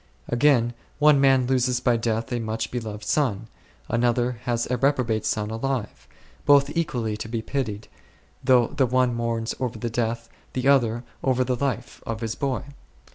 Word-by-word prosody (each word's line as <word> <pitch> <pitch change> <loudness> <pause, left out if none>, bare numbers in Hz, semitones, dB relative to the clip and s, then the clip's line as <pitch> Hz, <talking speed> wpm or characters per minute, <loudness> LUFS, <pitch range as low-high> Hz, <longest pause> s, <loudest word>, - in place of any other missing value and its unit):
Again, 120 -2 +3 0.2
one 150 -2 +5
man 135 -2 +4
loses 125 -1 +1
by 125 -1 +2
death 115 0 -1
a 120 - 0
much 110 0 -3
loved? 110 -3 -4
son; 115 -4 0 0.4
another 120 +1 +1
has 120 -1 0
a 125 - +1
reprobate 125 -5 +1
son 105 0 -1
alive; 120 0 -3 0.4
both 145 +1 +4
equally 120 -10 -1
to 110 - -6
be 115 -1 -3
pitied, 110 -7 -3 0.6
though 125 -2 +5
the 135 -3 +1
one 125 0 +2
mourns 115 -1 -2
over 125 -3 -2
the 115 +1 -3
death, 115 0 -2 0.3
the 130 +1 -1
other 120 -4 +3 0.2
over 130 -1 +2
the 125 0 0
life, 125 -2 -3
of 115 0 -3
his 115 -1 -2
boy. 135 -1 -2
120 Hz, 165 wpm, -24 LUFS, 115-130 Hz, 0.6 s, one